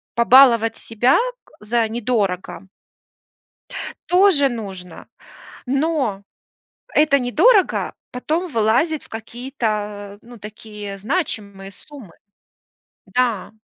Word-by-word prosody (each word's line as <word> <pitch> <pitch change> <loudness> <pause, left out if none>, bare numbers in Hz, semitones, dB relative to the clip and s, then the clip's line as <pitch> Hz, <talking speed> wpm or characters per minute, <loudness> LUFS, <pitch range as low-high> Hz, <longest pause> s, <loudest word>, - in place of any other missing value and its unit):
побаловать 235 -2 +5
себя 240 +4 +2 0.3
к - - -25
за 225 +1 0
недорого 205 -5 -2 1.4
тоже 355 -7 +4
нужно, 190 -7 -8 0.6
но 275 -7 -1 0.7
это 295 -2 +4
"недорого" 360 - +2 0.2
потом 315 +8 -2
вылазит 250 +6 +1
в - - -17
какие-то, 240 +3 -6 0.5
а, 205 - -18
ну, 240 0 -14
такие 210 -1 -9
значимые 205 - -3
суммы. 255 - -14 0.9
Да. 240 -6 -1
235 Hz, 90 wpm, -20 LUFS, 210-280 Hz, 1.4 s, побаловать